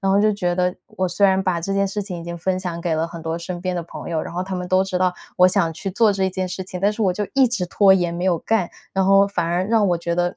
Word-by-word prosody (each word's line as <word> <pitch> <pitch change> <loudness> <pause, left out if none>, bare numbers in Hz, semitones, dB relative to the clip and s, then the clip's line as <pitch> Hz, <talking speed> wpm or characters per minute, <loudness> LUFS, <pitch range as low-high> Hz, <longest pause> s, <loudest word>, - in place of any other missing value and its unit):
然 195 0 +1
后 200 - +4
就 215 +1 +4
觉 180 -4 -1
得 180 0 0 0.2
我 185 - +1
虽 200 +3 +3
然 190 0 +2
把 175 -3 -1
这 195 - -2
件 195 0 +1
事 205 +1 -3
情 185 -3 -6
已 - - -8
经 170 0 -6
分 185 +2 -1
享 175 -2 -4
给 170 -2 0
了 160 +1 0
很 170 -1 -9
多 165 +1 -3
身 175 +1 -5
边 185 -1 -1
的 175 - -2
朋 170 - -8
友， 160 -2 0
然 - - -7
后 180 - -1
他 190 0 -5
们 180 0 -4
都 185 +1 +3
知 190 -1 -2
道 185 -1 +1 0.2
我 180 - +7
想 180 -4 +1
去 195 +5 -5
做 215 +2 +3
这 190 -1 0
件 185 0 -3
事 185 +1 -5
情， 185 0 -7
但 200 +3 +2
是 215 - -8
我 200 -4 +3
就 205 +3 -2
一 270 -2 +4
直 230 -6 -1
拖 190 +2 +4
延 175 -2 0
没 170 +1 -4
有 180 -2 +2
干， 210 -3 0 0.2
然 190 -1 +1
后 195 0 +6
反 175 -4 -2
而 175 +2 0
让 215 -2 +3
我 175 - +2
觉 170 0 -2
得 175 +1 -1
185 Hz, 345 characters per minute, -21 LUFS, 175-195 Hz, 0.2 s, 我